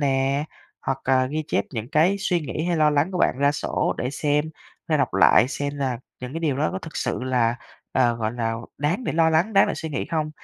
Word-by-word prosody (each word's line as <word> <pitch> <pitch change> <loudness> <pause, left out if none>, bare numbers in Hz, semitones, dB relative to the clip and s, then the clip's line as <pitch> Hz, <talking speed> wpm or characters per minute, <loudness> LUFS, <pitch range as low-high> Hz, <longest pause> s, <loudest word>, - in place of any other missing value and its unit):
nè 135 0 +1 0.4
hoặc 135 0 -2
là 130 -1 +3
ghi 155 +4 -2
chép - - +1
những 115 -3 -5
cái 170 +8 +3
suy 180 -3 0
nghĩ 155 +1 -4
hay 175 -1 0
lo 155 -1 +4
lắng 150 +5 +1
của 180 - -2
bạn - - +2
ra 140 +1 +3
sổ 145 - -1
để 125 +2 -1
xem 150 0 0 0.4
hay - - +2
đọc - - 0
lại 125 - +6
xem 145 0 -3
là 130 -4 -1 0.2
những 125 0 -6
cái 165 - -4
điều 150 -5 0
đó 155 +2 +1
có 190 - -3
thực 160 -3 -9
sự - - -2
là, 120 -2 +1 0.4
ờ, 120 -2 +3
gọi 110 -1 -2
là, 115 -2 -1 0.2
đáng 170 - -1
để - - -1
lo 160 0 +3
lắng, 170 +7 +2
đáng 195 -1 +5
để - - -1
suy 160 - -5
nghĩ 145 - -3
hông? 155 -2 -1
145 Hz, 245 wpm, -24 LUFS, 130-160 Hz, 0.4 s, lại